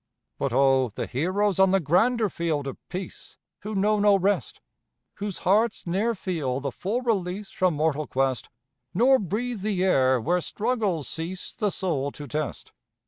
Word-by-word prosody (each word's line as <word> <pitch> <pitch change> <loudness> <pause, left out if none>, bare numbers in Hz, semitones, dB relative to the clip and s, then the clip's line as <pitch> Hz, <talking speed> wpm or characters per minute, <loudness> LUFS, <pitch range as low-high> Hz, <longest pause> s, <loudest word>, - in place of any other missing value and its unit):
But 140 - -1
oh, 135 0 +3
the 105 - -4
heroes 185 +8 0
on 190 0 +6
the 195 +1 +3
grander 215 - +2
field 165 -6 -2
of 135 - -4
peace, 185 +1 -7 0.2
Who 215 +2 -5
know 210 +2 +2
no 205 -1 +5
rest! 195 +2 0 0.6
Whose 205 -2 -4
hearts 215 +4 +1
ne'er 205 +7 0
feel 155 -10 -2
the 140 0 -3
full 205 - -2
release 200 -3 -1
From 185 -3 +1
mortal 155 -1 0
quest, 135 -1 -1 0.5
Nor 260 +6 +5
breathe 215 +3 -3
the 195 -3 0
air 130 -8 +3
where 175 +9 +1
struggles 205 - -1
cease 170 +3 -5
The 210 - -1
soul 155 -8 -2
to 145 - -8
test. 150 +2 -4
185 Hz, 160 wpm, -26 LUFS, 150-205 Hz, 0.6 s, on